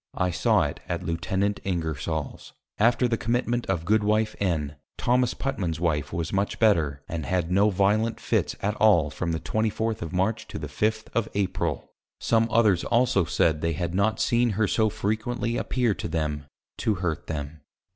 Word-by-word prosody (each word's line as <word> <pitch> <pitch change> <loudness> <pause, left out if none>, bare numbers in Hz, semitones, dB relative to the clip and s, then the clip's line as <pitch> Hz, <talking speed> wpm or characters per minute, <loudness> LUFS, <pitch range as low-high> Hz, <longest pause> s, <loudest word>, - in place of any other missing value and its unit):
I 90 0 0
saw - - +3
it - - -3
at - - -2
Lieut. 85 +1 -3 0.4
Ingersol's. 80 -4 -3 0.3
After 120 +3 +4
the 115 -1 -1
Commitment 120 +1 0
of 90 -4 -1
Goodw. 110 +2 +3
N. 80 -7 -1 0.2
Tho. - - -9 0.3
Putman's 95 -12 -2
Wife 75 -4 0
was 85 +1 -3
much 100 +1 0
better, 80 -11 +2
and 80 -1 -4
had 90 -2 0
no 100 +3 +4
violent 105 +4 +1
Fits - - 0
at 105 +1 +1
all 85 -9 +4
from 85 +2 -3
that 80 - -3
24th. 110 0 -1
of 85 -1 -4
March, 95 +5 -1
to - - -6
the 80 - -5
5th. 110 +9 -1
of 115 0 0
April. 100 -2 -2 0.3
Some 115 0 +2
others 110 -6 +3
also 120 -6 +2
said 80 -2 +1
they 85 0 0
had 85 +1 -3
not 100 +3 +1
seen 120 0 +2
her 110 -2 +2
so 110 +1 +2
frequently 115 +4 -2
appear 120 -4 +1
to - - -5
them, 75 -3 -2 0.3
to 110 - +1
hurt 90 -3 -3
them. 75 0 -5
95 Hz, 175 wpm, -26 LUFS, 80-110 Hz, 0.4 s, After